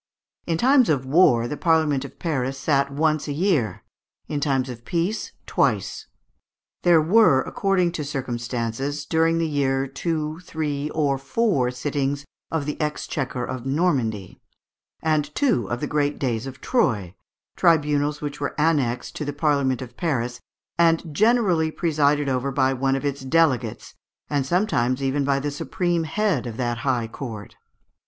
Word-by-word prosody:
In 165 -1 +1
times 255 - +4
of 135 -4 +1
war 130 -5 +4
the 150 - -3
Parliament 155 -4 +2
of - - -10
Paris 135 -5 -2
sat 140 0 +1
once 155 +2 0
a - - -2
year, 145 - 0 0.4
in 150 - -2
times 135 -3 0
of 120 -2 -8
peace 175 - -2
twice. - - 0 0.7
There 175 -2 +5
were, 165 -4 +5
according 190 -3 +1
to 165 -3 -4
circumstances, 130 +1 -3
during 165 +2 +2
the 165 -1 +1
year 135 -3 0
two, 155 +3 -3
three, 150 -4 -3
or 145 -3 0
four 140 - +1
sittings 140 +2 -2 0.2
of 160 -3 -2
the 150 +2 -4
exchequer 135 -4 -2
of 130 0 -5
Normandy, 130 - -1 0.6
and 150 -2 0
two 125 - +1
of 120 +2 -3
the - - 0
Great 145 -1 0
Days 120 -2 -2
of 135 0 -9
Troyes, 110 - +1 0.4
tribunals 150 -3 +2
which 145 -1 -5
were 145 - -3
annexed 140 -6 +1
to - - -3
the 145 - -3
Parliament 140 -4 +1
of 125 - -12
Paris, 125 -8 -1 0.4
and 165 -2 +3
generally 200 -5 +3
presided 150 -3 +1
over 130 +1 0
by 135 0 +2
one 135 +1 +1
of 135 - -3
its 140 -1 -2
delegates, 130 -5 +1 0.4
and 140 -2 0
sometimes 140 - +1
even 135 +1 +1
by 140 0 +1
the 145 +1 -2
supreme 170 +3 -1
head 165 - 0
of 115 -1 -6
that 120 -2 -1
high 125 -2 0
court. 110 -4 -8
145 Hz, 155 wpm, -23 LUFS, 130-160 Hz, 0.7 s, There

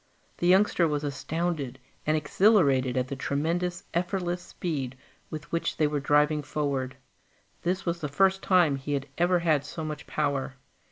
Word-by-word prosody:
The 175 - +1
youngster 185 -2 +4
was 150 -1 -1
astounded 145 -1 -2 0.3
and 155 0 +3
exhilarated 145 - +3
at 125 0 +1
the 140 - -4
tremendous, 170 +7 -1
effortless 175 0 -1
speed 135 -10 -4 0.3
with 155 +1 -7
which 170 - -1
they 155 - +3
were 150 0 0
driving 150 +1 +3
forward. 140 -3 -2 0.7
This 185 +2 -1
was 170 0 -1
the 150 - -1
first 190 +5 +3
time 175 -7 +4
he 145 +2 -4
had 140 0 -2
ever 175 +1 +4
had 160 -5 +2
so 155 +2 -6
much 155 -1 -6
power. 140 -3 -1
155 Hz, 160 wpm, -27 LUFS, 140-175 Hz, 0.7 s, youngster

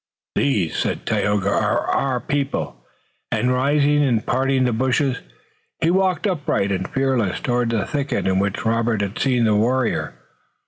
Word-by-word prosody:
"These," 105 - 0
said - - -2
Tayoga, 100 -1 0
"are - - +1
our 130 -2 0
people," 135 - -3 0.5
and 120 +3 +1
rising 145 +3 +2
and 120 -6 +1
parting 130 +1 +1
the 125 -2 +1
bushes, 130 +2 +1 0.6
he 165 - +2
walked, 190 +1 +1
upright 145 - 0
and 95 - -2
fearless, 130 -8 0
toward 120 -4 0
the 115 -2 0
thicket 145 -2 -2
in 95 0 +2
which 100 +2 -2
Robert 115 -1 +1
had 100 +1 -3
seen 125 -3 +2
the 110 -2 +3
warrior. 120 - 0
125 Hz, 150 wpm, -21 LUFS, 110-140 Hz, 0.6 s, the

